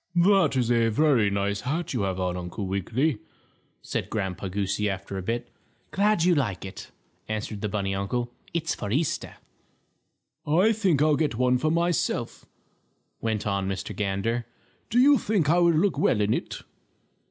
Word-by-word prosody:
"That's 170 Hz, -, +3 dB
a 115 Hz, -1 st, +3 dB
very 120 Hz, -3 st, +3 dB
nice 100 Hz, 0 st, -1 dB
hat 160 Hz, +6 st, -2 dB
you 120 Hz, -, -1 dB
have 95 Hz, -1 st, -1 dB
on, 90 Hz, -1 st, -1 dB
Uncle 90 Hz, +3 st, -5 dB
Wiggily," 110 Hz, -, 0 dB, 0.6 s
said -, -, -3 dB
Grandpa 95 Hz, -2 st, -3 dB
Goosey, 100 Hz, +2 st, -1 dB
after 95 Hz, 0 st, -5 dB
a 95 Hz, -, -3 dB
bit. 115 Hz, +5 st, -3 dB, 0.4 s
"Glad 205 Hz, -3 st, +2 dB
you 180 Hz, 0 st, +4 dB
like 105 Hz, -, -1 dB
it," 95 Hz, -, -9 dB, 0.4 s
answered 110 Hz, -1 st, -4 dB
the 105 Hz, -, -2 dB
bunny 100 Hz, -2 st, -1 dB
uncle. 120 Hz, +5 st, -2 dB, 0.2 s
"It's 165 Hz, -3 st, -1 dB
for 100 Hz, -, -5 dB
Easter." 145 Hz, +5 st, -1 dB, 1.1 s
"I 180 Hz, +9 st, +3 dB
think 185 Hz, -9 st, +2 dB
I'll 155 Hz, -1 st, +4 dB
get 150 Hz, -4 st, 0 dB
one 125 Hz, +1 st, +2 dB
for 155 Hz, -, +1 dB
myself," 170 Hz, 0 st, -1 dB, 0.7 s
went 110 Hz, -2 st, -2 dB
on 100 Hz, -2 st, -1 dB
Mr. 95 Hz, +1 st, -4 dB
Gander. 105 Hz, +4 st, -1 dB, 0.4 s
"Do 230 Hz, -, 0 dB
you 280 Hz, +2 st, +6 dB
think 185 Hz, -8 st, +1 dB
I 175 Hz, -, +4 dB
would 170 Hz, -1 st, +4 dB
look 170 Hz, -2 st, +2 dB
well 120 Hz, -, +3 dB
in 105 Hz, +1 st, +2 dB
it?" -, -, -3 dB
120 Hz, 165 wpm, -26 LUFS, 100-160 Hz, 1.1 s, you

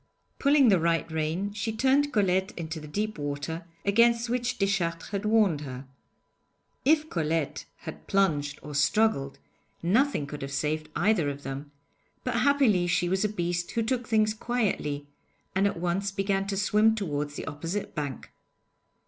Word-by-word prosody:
Pulling 280 Hz, -3 st, +5 dB
the 190 Hz, -4 st, +5 dB
right 165 Hz, 0 st, +1 dB
rein 160 Hz, +6 st, -1 dB
she 210 Hz, +2 st, -2 dB
turned 270 Hz, +5 st, +2 dB
Colette 190 Hz, -3 st, +1 dB
into 165 Hz, -1 st, -4 dB
the 150 Hz, -, -9 dB
deep 210 Hz, +4 st, -3 dB
water, 145 Hz, +4 st, -4 dB, 0.2 s
against 235 Hz, +3 st, +4 dB
which 245 Hz, 0 st, -1 dB
Deschartres 185 Hz, -4 st, 0 dB
had 200 Hz, +1 st, -3 dB
warned 210 Hz, -8 st, +3 dB
her. 130 Hz, -2 st, -7 dB, 1.0 s
If 310 Hz, +2 st, +3 dB
Colette 160 Hz, -, -1 dB, 0.2 s
had -, -, -9 dB
plunged 150 Hz, -8 st, +1 dB
or 150 Hz, -, -7 dB
struggled, 145 Hz, -1 st, +2 dB, 0.5 s
nothing 220 Hz, -, +2 dB
could 145 Hz, +1 st, -7 dB
have 135 Hz, 0 st, -5 dB
saved 155 Hz, +2 st, -1 dB
either 180 Hz, -6 st, +2 dB
of 140 Hz, 0 st, -6 dB
them, 135 Hz, +2 st, -6 dB, 0.5 s
but 250 Hz, -2 st, -1 dB
happily 245 Hz, -9 st, +3 dB
she 175 Hz, 0 st, +1 dB
was 190 Hz, +2 st, +1 dB
a 210 Hz, -, +2 dB
beast 175 Hz, -3 st, -2 dB
who 230 Hz, -, +1 dB
took 245 Hz, +1 st, -1 dB
things 215 Hz, -2 st, +3 dB
quietly, 210 Hz, -11 st, -1 dB, 0.5 s
and 195 Hz, +2 st, +3 dB
at 200 Hz, -, -2 dB
once 185 Hz, +3 st, -1 dB
began 195 Hz, 0 st, 0 dB
to 195 Hz, -1 st, -2 dB
swim 210 Hz, +2 st, +3 dB
towards 150 Hz, -7 st, -3 dB
the -, -, -5 dB
opposite 165 Hz, +7 st, -4 dB
bank. 145 Hz, -5 st, -5 dB
190 Hz, 155 wpm, -28 LUFS, 155-220 Hz, 1.0 s, Pulling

